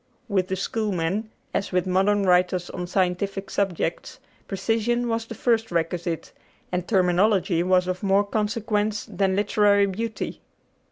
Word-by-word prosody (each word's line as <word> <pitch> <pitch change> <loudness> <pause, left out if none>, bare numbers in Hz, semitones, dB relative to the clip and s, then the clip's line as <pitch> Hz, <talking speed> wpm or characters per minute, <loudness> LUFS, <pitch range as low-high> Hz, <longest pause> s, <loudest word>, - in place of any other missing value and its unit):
With 190 -4 +1
the 190 - -1
Schoolmen, 200 0 -1 0.2
as 200 +1 -1
with 180 -1 +1
modern 195 +2 +2
writers 180 -1 +2
on 180 -1 -5
scientific 195 +2 -1
subjects, 180 -4 -2 0.3
precision 230 +4 0
was 225 -1 -2
the 230 - -7
first 225 -1 +1
requisite, 170 0 -2 0.4
and 180 -1 -2
terminology 185 -2 +3
was 180 0 +3
of 185 0 -2
more 200 0 +3
consequence 210 0 -1
than 190 0 0
literary 205 0 +3
beauty. 220 +3 -4
195 Hz, 130 wpm, -24 LUFS, 180-210 Hz, 0.4 s, terminology